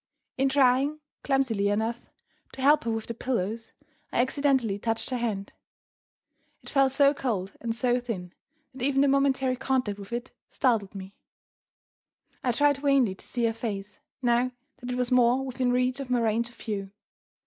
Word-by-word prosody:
In 270 +1 +2
trying 270 +2 +3 0.2
(clumsily 255 -7 +1
enough) 220 +3 -2 0.4
to 265 - -7
help 290 -2 +5
her - - 0
with 225 -1 -3
the 230 - -5
pillows, 225 -2 -3 0.4
I - - 0
accidentally 260 -5 +1
touched 225 +3 -2
her 255 - 0
hand. 210 -5 -3 1.1
It - - -10
felt 275 -2 +4
so 280 +1 +4
cold 210 -9 -2
and 230 -1 -2
so 245 +1 +2
thin, 195 -8 -5 0.4
that 260 - -10
even 275 0 +2
the 285 - +4
momentary 270 -2 +2
contact 255 -5 -1
with 200 +1 -10
it 240 +2 -4 0.2
startled 220 -6 0
me. 190 0 -8 1.3
I 250 - +2
tried 285 +3 +3
vainly 275 -7 +3
to 190 - -13
see 240 -2 0
her 225 - +1
face, 210 -3 -5 0.2
now 245 +1 +2 0.3
that 245 - -7
it 250 - -1
was 250 0 -1
more 250 +1 +4
within 255 -1 0
reach 250 +1 +1
of 270 -2 -5
my 250 -1 +2
range 230 +1 +1
of 240 - -19
view. 200 -4 -4
245 Hz, 170 wpm, -27 LUFS, 225-265 Hz, 1.3 s, help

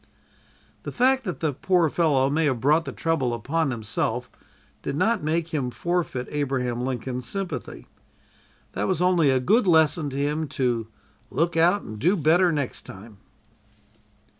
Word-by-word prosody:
The - - -6
fact 260 +1 +2
that 185 - -4
the 155 -3 0
poor 180 +4 +2
fellow 145 -4 +2
may 155 +3 +1
have 130 -5 0
brought 150 +6 +3
the - - -4
trouble 140 -8 -1
upon 140 +6 -1
himself 110 -4 -2 0.5
did - - -4
not 220 +7 +1
make 160 +2 -1
him 140 -6 -2
forfeit 170 -4 -2
Abraham 130 -4 -1
Lincoln's 125 -1 -3
sympathy. 175 -6 -5 0.9
That - - -2
was 185 -4 0
only 180 -4 +3
a 130 -1 +3
good 205 - +2
lesson 160 -2 +3
to 135 - -6
him 150 +2 -1
to 125 -5 -1 0.4
"Look 170 +2 0
out 175 +5 +3
and 110 -1 -8
do 180 - +2
better 175 +3 +3
next 145 -5 -2
time!" 105 +2 -12
150 Hz, 155 wpm, -24 LUFS, 130-170 Hz, 0.9 s, brought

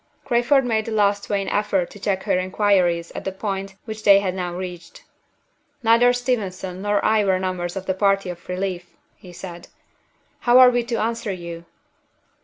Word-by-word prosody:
Crayford 245 +3 +3
made 220 -2 0
a - - -3
last 205 -1 +1
vain 200 -1 -1
effort 200 -4 0
to 205 - -12
check 190 -1 -1
her 180 - +1
inquiries 185 -3 +1
at - - -7
the 190 - -3
point 195 0 -4
which 220 -1 -7
they 200 -1 +7
had 190 -2 -2
now 180 -2 -3
reached. 175 -1 -8 0.8
"Neither 235 +2 +5
Steventon 200 -7 -3
nor 205 0 0
I 215 -1 +3
were 190 -2 +2
members 185 -1 -3
of 190 -1 -5
the 190 - 0
party 195 -1 +1
of 175 0 -13
relief," 180 -1 -4 0.2
he 180 - -14
said. 175 -1 -9 0.7
"How 240 0 +4
are 255 -1 +8
we 245 -1 0
to 235 -1 -2
answer 230 -1 -2
you?" 170 -2 -7
195 Hz, 180 wpm, -22 LUFS, 185-220 Hz, 0.8 s, are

